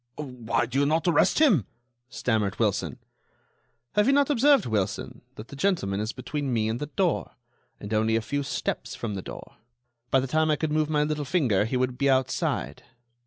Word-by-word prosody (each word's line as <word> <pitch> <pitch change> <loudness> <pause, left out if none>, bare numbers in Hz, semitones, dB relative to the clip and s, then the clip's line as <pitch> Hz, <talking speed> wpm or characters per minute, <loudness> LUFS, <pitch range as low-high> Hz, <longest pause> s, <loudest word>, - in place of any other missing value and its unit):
"Why 125 -5 -2
do 130 +3 -2
you 140 - +3
not 160 +4 +1
arrest 165 -4 +3
him?" 215 - +4 0.4
stammered 110 -5 -1
Wilson. - - 0 1.0
"Have 210 +2 +3
you 275 - +5
not 285 +1 +3
observed, 280 -2 +4
Wilson, 105 -3 -2
that 110 +4 -10
the - - -9
gentleman 140 - 0
is 110 +2 -2
between 145 -1 -4
me 110 -2 +1
and 115 +2 -2
the 150 - -4
door, 175 +2 -1 0.5
and 100 +2 -6
only 110 +1 +2
a 115 - +1
few 145 +5 -2
steps 140 - -3
from 115 -3 -4
the 95 - -4
door. - - -10 0.5
By 135 - +4
the 130 - -1
time 155 +4 +1
I 155 - +3
could 155 +1 -2
move 155 0 +1
my 150 -1 +2
little 150 0 -2
finger 130 - +1
he 125 +3 -1
would 125 0 -1
be 140 -1 +3
outside." 130 -1 0
140 Hz, 195 wpm, -26 LUFS, 115-155 Hz, 1.0 s, you